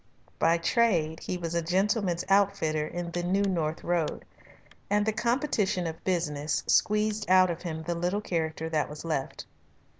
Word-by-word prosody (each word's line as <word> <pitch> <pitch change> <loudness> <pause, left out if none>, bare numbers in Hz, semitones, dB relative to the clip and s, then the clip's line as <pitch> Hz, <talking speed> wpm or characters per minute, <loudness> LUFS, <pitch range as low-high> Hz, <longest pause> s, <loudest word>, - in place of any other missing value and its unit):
By 165 +1 +4
trade 170 -5 +1
he 180 - -4
was 170 -1 -4
a 170 - +1
gentleman's 185 +1 0
outfitter 195 -6 +2
in 175 +1 -5
the 175 - -2
New 190 +3 +1
North 165 -5 -1
Road, 170 -3 -1 0.6
and 205 +1 +2
the 220 - +1
competition 220 - 0
of 160 -1 -5
business 150 -5 -1
squeezed 210 0 +1
out 185 -1 +6
of 170 - -6
him 160 -3 -5
the 170 +2 -2
little 175 +4 -1
character 160 -4 -2
that 155 -2 0
was 150 +2 -8
left. 145 -5 -3
175 Hz, 160 wpm, -28 LUFS, 160-200 Hz, 0.6 s, out